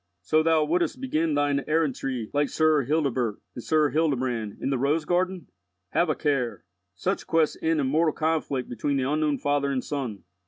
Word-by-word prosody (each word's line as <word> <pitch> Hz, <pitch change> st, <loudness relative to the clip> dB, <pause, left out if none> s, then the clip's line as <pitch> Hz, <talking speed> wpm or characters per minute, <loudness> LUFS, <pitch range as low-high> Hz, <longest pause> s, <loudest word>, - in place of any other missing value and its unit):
"So 155 Hz, +12 st, +3 dB
thou 160 Hz, -1 st, +3 dB
wouldst 170 Hz, +6 st, 0 dB
begin 165 Hz, -, 0 dB
thine 145 Hz, -1 st, +1 dB
errantry 135 Hz, -7 st, -1 dB
like 145 Hz, 0 st, +1 dB
Sir 155 Hz, -2 st, +3 dB
Hildebert 130 Hz, -7 st, 0 dB
and 120 Hz, -, -8 dB
Sir 155 Hz, -2 st, +2 dB
Hildebrand 130 Hz, -9 st, -1 dB
in -, -, -2 dB
the 135 Hz, -, 0 dB
'Rose 150 Hz, +4 st, +1 dB
garden'? 180 Hz, 0 st, 0 dB, 0.5 s
Have 170 Hz, -1 st, +2 dB
a 155 Hz, -, +1 dB
care. 125 Hz, -, -1 dB, 0.3 s
Such -, -, -2 dB
quests 160 Hz, -2 st, +2 dB
end 160 Hz, -1 st, +1 dB
in 140 Hz, -, +1 dB
mortal 155 Hz, +3 st, +2 dB
conflict 155 Hz, -5 st, -1 dB
between 140 Hz, +4 st, -1 dB
the 130 Hz, -1 st, 0 dB
unknown 150 Hz, 0 st, +1 dB
father 145 Hz, 0 st, 0 dB
and 130 Hz, -2 st, -1 dB
son." 130 Hz, -9 st, -4 dB
145 Hz, 180 wpm, -26 LUFS, 135-160 Hz, 0.5 s, So